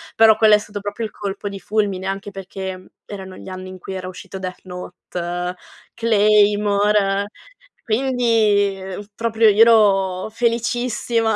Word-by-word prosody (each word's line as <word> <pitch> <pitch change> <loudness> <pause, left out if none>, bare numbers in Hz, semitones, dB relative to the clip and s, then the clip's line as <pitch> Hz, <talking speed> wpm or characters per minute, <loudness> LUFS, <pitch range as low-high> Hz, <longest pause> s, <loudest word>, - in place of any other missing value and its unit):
però 220 -1 +6
quello 215 -1 +5
è 210 - +6
stato 205 0 -7
proprio 205 +2 -4
il - - -19
colpo 200 0 -5
di 195 -1 -7
fulmine 195 0 -1
anche 195 +1 -4
perché, 190 -1 -6
mhmm, 185 - -16 0.2
erano 190 -2 -8
gli - - -10
anni 185 0 -7
in 185 0 -10
cui 190 +2 -7
era 185 0 -5
uscito 185 +1 -9
Death 185 -1 -6
Note, 180 0 -5 0.4
Claymore, 205 -2 +3 0.6
quindi, 225 -5 +2
ehm, 190 +2 -7
proprio 225 -1 +3
io 210 +2 +4
ero 195 -4 +4
felicissima. 235 -1 0
205 Hz, 150 wpm, -20 LUFS, 190-220 Hz, 0.6 s, però